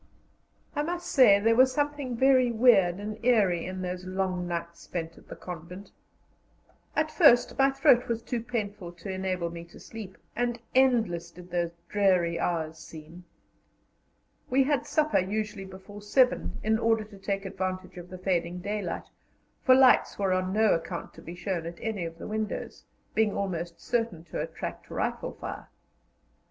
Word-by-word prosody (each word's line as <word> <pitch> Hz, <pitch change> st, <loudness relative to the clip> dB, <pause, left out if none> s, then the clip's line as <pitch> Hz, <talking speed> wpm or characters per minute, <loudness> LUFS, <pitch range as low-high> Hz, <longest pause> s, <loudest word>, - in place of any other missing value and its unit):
I 295 Hz, -, +1 dB
must 350 Hz, +3 st, -3 dB
say 215 Hz, -7 st, +7 dB
there 225 Hz, +2 st, +3 dB
was 260 Hz, +2 st, +6 dB
something 290 Hz, -3 st, -2 dB
very 260 Hz, -1 st, +5 dB
weird 220 Hz, -7 st, +5 dB
and 215 Hz, +2 st, -6 dB
eerie 200 Hz, -9 st, +3 dB
in 185 Hz, 0 st, -5 dB
those 180 Hz, 0 st, -4 dB
long 185 Hz, -1 st, -2 dB
nights 170 Hz, -1 st, -4 dB
spent 165 Hz, -2 st, -5 dB
at -, -, -18 dB
the -, -, -8 dB
convent. 180 Hz, +3 st, -9 dB, 1.0 s
At 310 Hz, 0 st, +1 dB
first 285 Hz, -10 st, +5 dB
my 270 Hz, 0 st, +6 dB
throat 270 Hz, -2 st, +4 dB
was 230 Hz, -1 st, -2 dB
too 235 Hz, -1 st, -3 dB
painful 210 Hz, -6 st, -4 dB
to 175 Hz, +3 st, -7 dB
enable 185 Hz, -2 st, -2 dB
me 170 Hz, 0 st, -7 dB
to 170 Hz, -, -15 dB
sleep, 210 Hz, -4 st, -9 dB, 0.2 s
and 240 Hz, -1 st, -1 dB
endless 225 Hz, -10 st, +2 dB
did 180 Hz, +1 st, -14 dB
those 175 Hz, -1 st, 0 dB, 0.2 s
dreary 180 Hz, -5 st, +2 dB
hours 160 Hz, -2 st, -2 dB
seem. 165 Hz, +3 st, -12 dB, 1.2 s
We 270 Hz, +2 st, +4 dB
had 280 Hz, -1 st, 0 dB
supper 310 Hz, 0 st, +2 dB
usually 205 Hz, +1 st, -3 dB
before 190 Hz, +2 st, -11 dB
seven, 210 Hz, -, +2 dB
in 220 Hz, +1 st, +2 dB
order 225 Hz, -1 st, +2 dB
to 205 Hz, -2 st, -14 dB
take 195 Hz, 0 st, -3 dB
advantage 185 Hz, -1 st, -4 dB
of 175 Hz, 0 st, -11 dB
the 185 Hz, -, -8 dB
fading 180 Hz, -2 st, -1 dB
daylight, 200 Hz, -2 st, -3 dB, 0.6 s
for 255 Hz, -, +7 dB
lights 260 Hz, -1 st, +5 dB
were 195 Hz, -2 st, +1 dB
on 185 Hz, 0 st, 0 dB
no 215 Hz, +1 st, +4 dB
account 165 Hz, +1 st, -4 dB
to -, -, -13 dB
be 170 Hz, -, -8 dB
shown 180 Hz, -2 st, -3 dB
at 170 Hz, 0 st, -7 dB
any 215 Hz, -6 st, -3 dB
of 165 Hz, 0 st, -7 dB
the -, -, -8 dB
windows, 215 Hz, 0 st, -4 dB, 0.3 s
being 220 Hz, -2 st, +2 dB
almost 175 Hz, -3 st, -3 dB
certain 230 Hz, -9 st, -2 dB
to 170 Hz, -, -5 dB
attract -, -, -6 dB
rifle -, -, -2 dB
fire. -, -, -7 dB
195 Hz, 165 wpm, -28 LUFS, 175-230 Hz, 1.2 s, say